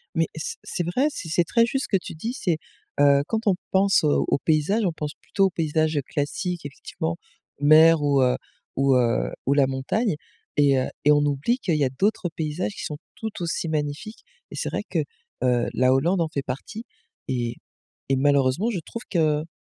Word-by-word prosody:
Mais 165 -1 +2
c'est 155 - -4
c'est 175 - -3
vrai, 250 - +1
c'est 170 - -7
c'est 170 +2 +3
très 230 +7 +3
juste 270 +3 -1
ce - - -10
que 195 - +3
tu - - -8
dis, 225 +10 -4
c'est 175 - -1 0.4
heu, 140 -1 +6
quand 225 +1 -2
on 195 - +4 0.2
pense, 195 -1 +4
heu, - - +3 0.2
aux - - +2
paysages, 165 +9 +1
on 175 - 0
pense 150 -2 -5
plutôt 195 - +1
aux - - +3
paysages 155 -3 0
classiques 170 +4 -3
effectivement 160 +3 -5 0.4
mer 155 +2 +6
ou 140 -2 +3
heu 125 -1 +3 0.4
ou 135 0 +4
heu, 120 -2 +2 0.2
ou 140 - +3
la 140 -2 +4
montagne 150 - -1 0.4
et 140 -2 +4
heu, 130 - -1 0.2
et 150 - +5
on 145 0 +4
oublie 145 - 0
qu'il 170 -9 0
y 150 - +1
a 130 - +2
d'autres 180 +7 0
paysages 160 +4 -3
qui - - -7
sont 150 - -5 0.2
tout 220 -1 -5
aussi 170 0 -2
magnifiques 155 - -3 0.3
et - - -7
c'est - - -2
vrai - - -3
que, - - 0 0.4
heu, 125 -2 +2
la 130 +1 +3
Hollande 170 +7 +2
en 165 - 0
fait 140 - -2
partie 215 - -6 0.4
et 120 -2 -2 0.5
et 135 - +3
malheureusement 140 - +2
je 195 - -2
trouve 230 - -7
qu'on 155 -2 0
155 Hz, 200 wpm, -24 LUFS, 140-185 Hz, 0.5 s, heu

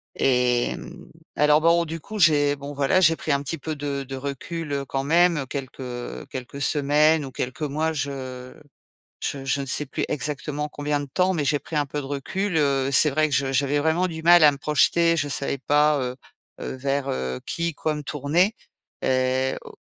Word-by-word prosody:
et 125 -2 +2
mmh, - - -11 0.3
alors 150 +1 +5
bon 170 +1 +4
du 165 +1 -5
coup, 215 +7 -8
j'ai 145 -4 +4
bon 140 +1 -8
voilà 140 +6 +2
j'ai 165 -2 +5
pris 155 - -3
un 140 0 +2
petit 165 +4 -4
peu 155 +2 -4
de 140 -1 -3
de 135 0 -7
recul, 145 +4 -5
heu, 140 -1 -2
quand 135 +1 -3
même 165 -1 +3
quelques 130 -2 -6
quelques 130 +2 -7
semaines 150 +1 +3
ou 135 - -8
quelques 125 +6 -5
mois. 155 +3 -1
Je 130 -3 -5 0.7
je 135 -1 -3
je 140 +1 0
ne - - -6
sais 150 +2 0
plus - - -3
exactement 150 0 -3
combien 145 0 -2
de 145 - -5
temps 180 +7 +1
mais 150 - -1
j'ai 145 +1 +2
pris 155 - -7
un 145 -1 +1
peu 145 +2 -4
de - - -7
recul, 165 +7 -2
heu, 135 -2 +1
c'est 150 - +6
vrai 155 +2 +2
que - - 0
je 135 -1 +1
j'avais 140 +2 +1
vraiment 160 +5 +1
du 160 -2 -6
mal 175 0 +7
à 150 - +7
me 140 - -8
projeter. 165 +3 +3
Je 145 -2 -1
savais 140 0 -1
pas, 150 +2 +3
heu 125 -1 -3 0.5
heu, - - -5
vers, 135 +1 -2
heu, 65 0 -3
qui, 170 0 -1
quoi, 155 +2 -2
me 150 - -5
tourner 155 - +1 0.5
et 130 0 +1
o - - -12
145 Hz, 205 wpm, -24 LUFS, 135-155 Hz, 0.7 s, mal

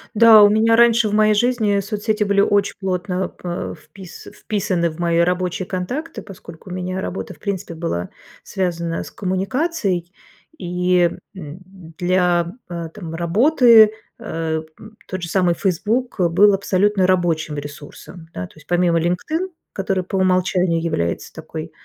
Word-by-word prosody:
Да, 220 -1 +8
у 205 - +7
меня 225 +2 +3
раньше 235 -2 +4
в - - -4
моей 215 0 +4
жизни 215 -3 +1
соцсети 210 +2 -1
были 200 -1 +2
очень 200 0 +1
плотно, 185 0 -2
п 175 -1 -6
впис 180 +3 -13
вписаны 180 -5 -2
в 160 - -13
мои 170 -1 +1
рабочие 180 +1 0
контакты, 250 - -5
поскольку 185 -3 -12
у - - -6
меня 185 +1 -4
работа, 190 - -5
в - - -21
принципе, 195 -4 -4
была 160 - -3 0.3
связана 170 -3 -3
с - - -10
коммуникацией. 195 - -2 0.5
И, 180 0 +1 0.3
м, 160 -1 -9 0.4
для, 175 -1 +1 0.2
э, 170 -1 -5
там 170 -6 -7
работы, 220 - +5 0.3
э, 160 -1 -3 0.2
м, 215 0 -14
тот 185 -2 -5
же 170 - -4
самый 180 -3 +2
"Фейсбук" 215 +6 -1
был 200 +3 +5
абсолютно 195 0 +1
рабочим 165 -5 0
ресурсом. 145 +4 -10
Да, 90 - -4
то - - -16
есть, 155 - -18
помимо 175 -1 +2
"Линкдин", 310 - -2 0.2
который 190 -1 -1
по 190 +2 -4
умолчанию 185 -2 +1
является 85 - -2
такой, - - -8
185 Hz, 150 wpm, -20 LUFS, 170-210 Hz, 0.5 s, Да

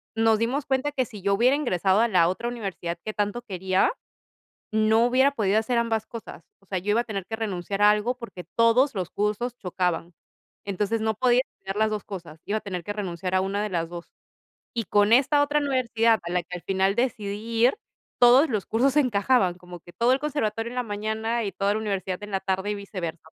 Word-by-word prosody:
Nos 225 -1 +3
dimos 260 +5 -1
cuenta 265 +2 0
que 260 -3 0
si 210 -5 -11
yo 200 +1 +1
hubiera 250 +6 +4
ingresado 195 - +1
a 235 - +4
la 180 -6 +4
otra 210 +7 -2
universidad 195 -7 -4
que 215 - -3
tanto 210 +4 -2
quería, 190 -3 +1 0.8
no 220 +2 +3
hubiera 265 +3 +4
podido 215 -4 +2
hacer 235 +2 -1
ambas 225 -2 0
cosas. 230 -1 -9 0.2
O - - -27
sea, 190 - -3
yo 200 +4 -1
iba 225 +3 +3
a - - -4
tener 195 -5 -5
que 220 - -4
renunciar 200 -2 -3
a 210 - +7
algo, 210 +4 +1
porque 210 -8 -9
todos 230 +3 +4
los 185 -3 -3
cursos 215 +4 -2
chocaban. 180 -3 -2 0.5
Entonces, 205 +3 -1
no 220 -1 0
podía 250 +2 +3 0.2
hacer 195 0 -4
las 220 +1 +2
2 210 -2 -3
cosas. 170 -5 -9
Iba 215 +2 -1
a - - -22
tener 185 -5 -5
que 205 - -4
renunciar 185 -2 -3
a 185 - +3
1 195 +2 -1
de 210 - -2
las 165 -3 -2
2. 175 0 -9 0.6
Y 230 -2 -1
con 205 +2 +3
esta 285 +3 +5
otra 290 +1 +1
universidad, 235 -5 +2
a 170 - -5
la 180 0 0
que 180 +1 -7
al - - -17
final 190 0 +1
decidí 215 -5 -1 0.3
ir, 255 - +5 0.4
todos 250 +5 +6
los 210 -5 -2
cursos 265 +5 +1
encajaban. 240 -6 +3
Como 180 -1 -12
que 175 - -15
todo 240 +2 +2
el 265 - +3
conservatorio 235 -7 -2
en 250 - -8
la 250 - +1
mañana 220 +2 -2
y 200 - -3
toda 200 +1 0
la - - 0
universidad 195 -3 -3
en 205 - -9
la 195 - 0
tarde, 190 +1 -1
y 210 - -1
viceversa. 185 -5 -6
210 Hz, 220 wpm, -25 LUFS, 190-235 Hz, 0.8 s, a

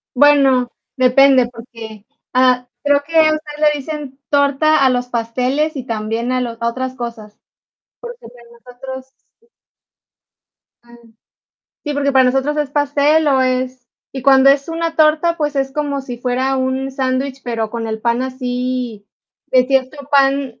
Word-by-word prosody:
Bueno, 270 -3 +4 0.3
depende, 255 0 +5
porque, 230 -3 -11 0.3
ah, 255 -1 +3 0.2
creo 285 -1 +3
que 315 +3 -13
ustedes 310 -2 +2
le 300 -1 +4
dicen 285 -2 -7
torta 285 +1 +3
a - - +5
los 250 -1 -1
pasteles, 250 +6 -1
y 255 - -6
también 225 +1 -3
a 255 - 0
los 235 -2 -5
otras 255 +2 -3
cosas. 230 -4 -8 0.6
Porque 480 -1 -8
el - - -10
de 245 -1 -17
nosotros 250 +2 -10 0.3
sí. 465 - -32 1.4
Am, 240 0 -18 0.9
sí, 295 -1 -3
porque 280 0 0
para 265 -1 +5
nosotros 270 +4 0
es 295 -2 -2
pastel, 290 +2 +2
o 270 -2 +3
es 255 -1 -2 0.3
y 265 - -6
cuando 270 0 +5
es 275 +1 +1
una 330 0 -3
torta, 315 +2 +3
pues 295 -2 -2
es 270 0 -1
como 285 -1 -2
sí 245 -3 -8
fuera 255 +2 -1
un 260 +1 -2
sándwich, 265 0 -2
pero 225 -3 -3
con 230 -1 -4
el 220 0 -4
pan 235 +2 0
así 250 -4 -4 0.4
de 255 -1 +3
cierto 270 +1 -1
pan. 275 -3 +1
260 Hz, 155 wpm, -17 LUFS, 245-285 Hz, 1.4 s, depende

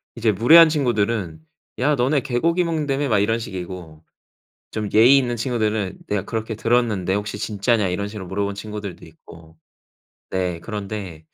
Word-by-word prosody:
이제 115 -2 +1
무례한 155 - +7
친구들은 110 - -1 0.4
"야. 145 +4 +2
너네 135 +3 +1
개고기 165 +9 0
먹는다며?" 145 -4 -1
막 105 -3 +3
이런 115 +3 +1
식이고. 90 -6 -8 0.7
좀 105 -2 -3
예의 120 +6 +7
있는 125 -3 0
친구들은 110 -5 -1
"내가 105 -2 -1
그렇게 110 0 -4
들었는데 110 -5 +1
혹시 105 0 -3
진짜냐?" 105 0 0
이런 100 +3 -2
식으로 105 -3 -8
물어본 100 +2 -2
친구들도 105 -2 -7
있고. 80 0 -16 0.7
네. 90 -3 -2
그런데 100 -6 -6
105 Hz, 350 characters per minute, -22 LUFS, 95-120 Hz, 0.7 s, 무례한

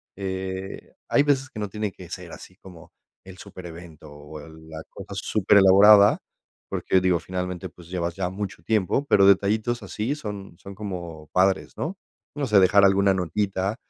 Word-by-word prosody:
eh, 95 0 -6 0.2
hay 145 - +4
veces 135 -2 0
que 110 - -9
no 105 - -3
tiene 105 0 -4
que 90 -2 -13
ser 90 -2 -8
así 90 - -12
como 90 -4 -15 0.3
el 95 -1 -12
superevento 85 -4 -11
o 75 +1 -11
la 80 0 -11
cosa - - -10
superelaborada, 100 0 +5 0.5
porque, 95 - 0
digo, 90 -2 +2
finalmente, 90 0 -5
pues 85 0 -17
llevas 85 -2 -3
ya 95 -2 -2
mucho 95 -3 -6
tiempo, 110 +6 0
pero 100 -8 +4
detallitos 110 +4 +2
así 110 +8 -3
son 100 - -8
son 100 0 -11
como 85 -6 -7
padres, 95 +1 +1
¿no? 170 +7 -4 0.4
No 145 -2 -2
sé, 105 -4 +5
dejar 100 +2 +5
alguna 100 0 +3
notita. 95 +2 -2
95 Hz, 160 wpm, -24 LUFS, 90-105 Hz, 0.5 s, superelaborada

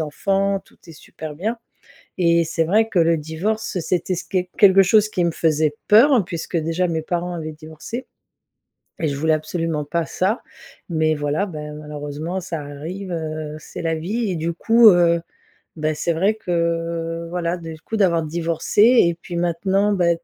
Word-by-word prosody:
enfants 195 +5 0
tout - - -25
est 165 - -11
super 155 0 -9
bien. 215 +9 -3 0.6
Et 170 -1 +3
c'est 165 0 0
vrai 215 +7 +3
que 200 - 0
le 165 0 +4
divorce 180 +7 -3
c'était 180 +2 -1
s 175 - -5
que 190 - -1 0.2
quelque 195 -1 +7
chose 210 +3 +4
qui 180 -4 0
me 170 - +2
faisait 155 -2 +1
peur 235 +1 +6
puisque 170 0 -4
déjà 165 +3 0
mes 160 -1 -1
parents 175 +2 -3
avaient 155 -2 -5
divorcé. 160 - -8 0.9
Et 160 - 0
je 140 - -3
voulais 160 +3 +1
absolument 155 -1 -3
pas 165 +2 -2
ça, 200 +6 0 0.5
mais 160 -2 +1
voilà, 150 +5 -1
ben, 150 -5 -7
malheureusement 150 +3 -5
ça 170 -3 -5
arrive, 160 +7 -7
heu, 155 -2 -4
c'est 155 - -8
la 165 0 0
vie. 200 +7 -2
Et - - -2
du 165 +1 -2
coup, 225 +6 +6
heu, 170 -2 +4 0.5
bah, 155 -1 -1
c'est 170 +3 -1
vrai 195 +7 +1
que 170 -3 -2
voilà 175 0 -2
des 165 -2 -8
coup 220 +7 -4
d'avoir 175 -5 +3
divorcé 165 +4 0
et 220 -8 +5
puis 175 - -8
maintenant, 190 +4 +1
bah, 180 -3 +2
170 Hz, 175 wpm, -21 LUFS, 160-190 Hz, 0.9 s, quelque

